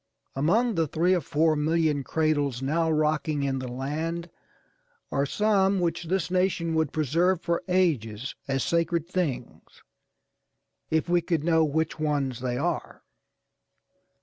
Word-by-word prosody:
Among 210 - +2
the 165 -4 +1
three 170 +5 +2
or 180 - +1
four 155 +2 +2
million 155 -1 +1
cradles 145 -4 0
now 160 +4 +1
rocking 155 -1 0
in 135 -1 -1
the 130 - -5
land 160 +7 -4 0.8
are 140 0 0
some 200 0 +2
which 170 -1 -1
this 180 +1 -1
nation 180 -3 +1
would 160 -3 +1
preserve 165 +4 +1
for 170 0 -1
ages 140 - 0
as 135 -1 0
sacred 170 -1 0
things, 180 -8 -4 1.1
if 160 +1 +1
we 175 0 +3
could 165 -2 -1
know 160 -1 +3
which 160 +1 -1
ones 145 -5 -1
they 125 -1 -2
are. - - -3
160 Hz, 135 wpm, -26 LUFS, 145-170 Hz, 1.1 s, we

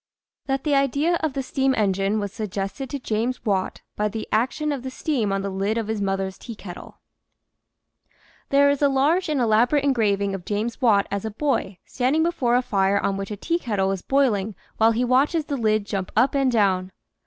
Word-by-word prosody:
THAT 270 0 -1
THE 300 - +1
IDEA 280 +5 +2
OF 310 -3 -1
THE 270 0 -2
STEAM 265 +1 0
ENGINE 200 0 +1
WAS 205 -2 -4
SUGGESTED 200 +4 -4
TO 285 - -3
JAMES 240 0 -2
WATT 195 -3 -1
BY 210 - 0
THE 220 +1 -5
AC 225 +4 +3
TION 305 -1 -2
OF 280 -3 -3
THE 260 - -5
STEAM 255 -6 -1
ON 195 0 -1
THE 200 - -3
LID 195 +4 -1
OF 225 -2 -3
HIS 220 -2 -2
MOTHER'S 195 -1 -2
TEAKETTLE 205 -6 -10 1.5
HERE 280 +1 +5
is 285 - -2
a 285 - +4
large 310 +7 +2
and 300 -3 0
elaborate 240 +5 +3
engraving 205 -7 +1
of 195 -2 -5
James 215 +4 -3
Watt 210 -5 +4
as 200 -1 -2
a 220 - -2
boy 220 -5 -1
standing 265 +5 +1
before 265 -8 +1
a 250 - +2
fire 200 -3 +1
on 195 - -1
which 195 0 -5
a 210 - -5
teakettle 215 - -1
is 195 -2 -3
boiling 220 -7 +1 0.2
while 225 +1 +5
he 245 +3 0
watches 285 +6 +2
the 290 - -3
lid 215 -4 +1
jump 195 -2 -4
up 265 - +4
and 275 -2 +2
down. 190 -5 +1
225 Hz, 200 wpm, -23 LUFS, 200-275 Hz, 1.5 s, HERE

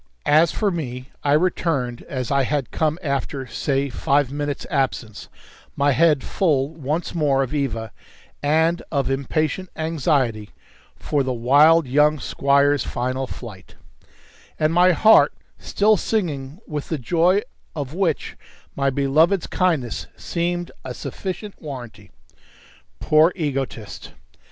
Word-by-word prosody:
As 155 +2 +4
for 210 -2 0
me, 130 -6 -5
I 145 - +2
returned 150 -7 0
as 130 -1 -3
I 140 0 +3
had 140 0 -1
come 155 0 0
after 140 -1 -2
(say) 135 +2 -1
five 140 0 +1
minutes' 145 0 -3
absence; 130 -7 -2 0.5
my 145 +1 +2
head 150 0 +3
full 145 -7 +1
once 155 +1 -3
more 145 -5 +2
of 130 - -5
Eva, 115 -7 -2 0.5
and 160 +4 +2
of 140 -3 0
impatient 155 +6 -1
anxiety 140 -9 0 0.5
for 145 - -1
the 130 -1 -1
wild 145 +7 +5
young 150 +3 +3
squire's 140 +2 +2
final 130 +2 -3
flight; 105 -8 -10 0.8
and 155 +1 +2
my 180 +2 +5
heart 220 +6 +5 0.3
still 210 +1 +2
singing 155 -8 -2
with 150 -2 -5
the 160 - -1
joy 175 - +2 0.3
of 145 -2 -4
which 175 -4 -1 0.4
my 140 0 +1
beloved's 150 +7 +2
kindness 160 - -1
seemed 175 0 -3
a 125 -1 -6
sufficient 195 +2 -6
warranty. 120 - -9 0.9
Poor 155 +3 +4
egotist! 135 - -4
145 Hz, 125 wpm, -22 LUFS, 135-165 Hz, 0.9 s, wild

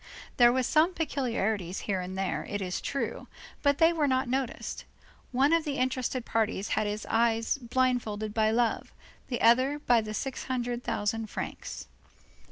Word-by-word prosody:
There 240 -1 +7
were 260 +1 +1
some 320 +8 +3
peculiarities 220 - -1
here 195 -3 -1
and 185 +1 -6
there, 195 -1 -1
it 205 - -2
is 180 -2 -3
true, 275 - -3 0.3
but 285 -1 +3
they 330 +1 +5
were 310 -3 +1
not 260 0 +1
noticed; 260 0 -3 0.5
one 270 +5 +3
of 330 -1 +3
the 290 -3 -3
interested 255 -1 -1
parties 220 -3 -1
had 215 -1 +1
his 210 0 -3
eyes 230 +3 +1
blindfolded 235 -4 0
by 215 -1 +3
love, 230 0 0 0.4
the 245 - -3
others 255 +5 +4
by 240 -2 +5
the 215 0 -5
six 270 +2 -4
hundred 245 -1 -2
thousand 220 +2 -1
francs. - - -6
240 Hz, 165 wpm, -29 LUFS, 215-265 Hz, 0.5 s, There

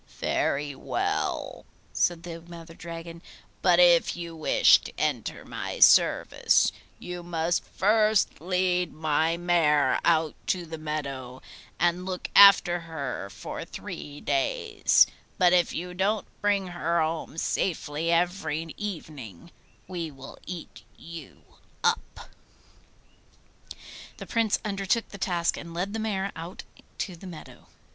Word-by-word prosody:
'Very 145 +1 0
well,' 135 - -2 0.3
said 170 -1 +1
the 165 -1 -7
Mother 170 0 -11
Dragon; 165 0 -8 0.4
'but 175 -2 +4
if 175 -1 +5
you 170 -1 -6
wish 155 - +5
to - - -9
enter - - -2
my - - -5
service, - - +5 0.3
you 180 0 -7
must 170 0 -1
first 215 -2 +2
lead 180 -1 0
my 160 +1 +1
mare 170 -4 +3
out 160 -2 +2
to 180 -2 0
the 160 -1 -7
meadow 140 -5 -5 0.4
and 175 +1 +1
look 185 -1 -4
after 195 -3 +8
her 145 -11 -5
for - - -7
three 145 0 -8
days; 135 -2 +2 0.3
but 180 -1 +5
if 175 -1 +3
you 180 +2 -5
don't 195 +3 0 0.2
bring 200 -2 +1
her 170 -1 -1
home 160 0 -2
safely 165 -2 -1
every 165 -2 0
evening, 155 - -7 0.4
we 170 -3 -4
will 135 -2 -12
eat 175 -2 -8 0.2
you 165 0 -11 0.4
up.' 460 0 -1 1.9
The - - -8
Prince 225 -3 +1
undertook 200 +2 -1
the 200 - -10
task 175 -2 0
and 170 -1 -9
led 190 +4 -2
the 225 - -2
mare 200 -3 -2
out 165 +3 -8 0.3
to 185 - -4
the 185 +3 -11
meadow. 170 -4 -11
170 Hz, 125 wpm, -27 LUFS, 160-185 Hz, 1.9 s, after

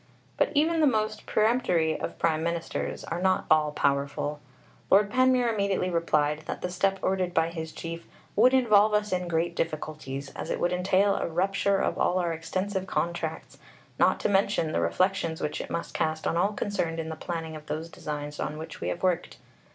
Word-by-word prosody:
But - - +1
even 320 +3 +3
the 305 - +5
most 215 -3 -1
peremptory 215 -8 +2
of - - -5
Prime 160 -2 +1
Ministers 170 0 -3
are 170 +1 -4
not 190 0 +2
all 155 -1 +4
powerful. 140 +1 -1 0.5
Lord 200 +1 +5
Panmure 255 -2 +3
immediately 200 -3 0
replied 155 -3 +1
that - - -5
the 180 - -2
step 195 +2 +1
ordered 185 -2 0
by 165 0 +3
his 160 -2 -5
Chief 165 0 -7 0.3
"would 245 +5 +6
involve 215 -5 +5
us 210 0 0
in 180 -1 -1
great 170 0 0
difficulties, 150 -4 -4
as - - -6
it - - -1
would 175 +1 +1
entail 190 +2 +2
a - - -1
rupture 195 +3 +1
of - - -1
all 180 - +2
our 175 -2 0
extensive 190 +4 -3
contracts, 170 -3 -3 0.4
not - - +4
to - - +2
mention 195 -5 +2
the - - 0
reflections 165 - 0
which 150 - -2
it - - -8
must 170 - -4
cast 155 0 -1
on - - 0
all 195 +5 +2
concerned 170 -6 -2
in 160 0 -3
the 160 - -4
planning 165 -1 -5
of 155 0 -10
those 155 +2 -3
designs 150 -2 -6
on 150 - -3
which 160 +1 -8
we - - -2
have 175 - -3
worked.... 180 -3 0
170 Hz, 190 wpm, -27 LUFS, 160-200 Hz, 0.5 s, would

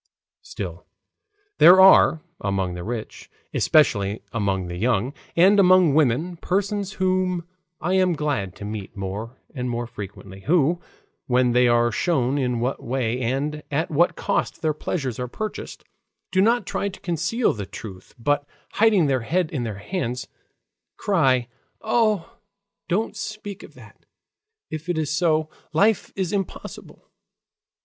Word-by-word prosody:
Still, - - -7 0.7
there 180 +2 +9
are, 190 -4 +7 0.2
among 95 -2 -1
the 90 0 -6
rich, 115 +1 -6 0.2
especially 105 -9 +2
among 100 -4 0
the 85 0 -6
young, 120 +4 0 0.2
and 195 +4 +6
among 185 -5 +6
women, 155 +4 +1
persons 200 +2 -1
whom 185 -2 0 0.3
I 175 +4 -1
am 185 -1 +3
glad 145 - -2
to 105 - -8
meet 105 -1 -6
more 105 +6 -5 0.2
and 125 -3 -3
more 120 0 -2
frequently, 100 -4 -9
who, 165 - +2 0.5
when 125 -1 +3
they 125 +1 +4
are 120 0 +3
shown 135 0 +1
in 125 -3 0
what 125 +3 -2
way 125 -1 -1
and 140 +5 -1
at 160 +4 -1
what 170 +4 +3
cost - - -2
their 155 -1 +2
pleasures 135 -5 -3
are 125 - -2
purchased, 215 - -6 0.5
do 190 - +3
not 235 +4 +3
try 200 - -2
to 195 - -11
conceal 175 +6 0
the 100 -3 -6
truth, 95 -4 -10
but 145 +4 0 0.2
hiding 210 -6 +4
their 135 -3 +1
heads 170 +7 0
in 130 -6 -2
their 105 -3 -5
hands, 125 - -4 0.7
cry: 135 - +2 0.4
"Ah! 215 -5 +1 0.5
don't 210 +4 0
speak 210 -1 -6
of - - -14
that. - - -16 0.7
If 160 +2 -6
it 175 - 0
is 155 -1 -1
so, 155 -2 +2 0.3
life 205 +6 +2
is 190 0 -2
impossible." 195 -3 -6
150 Hz, 145 wpm, -23 LUFS, 120-185 Hz, 0.7 s, there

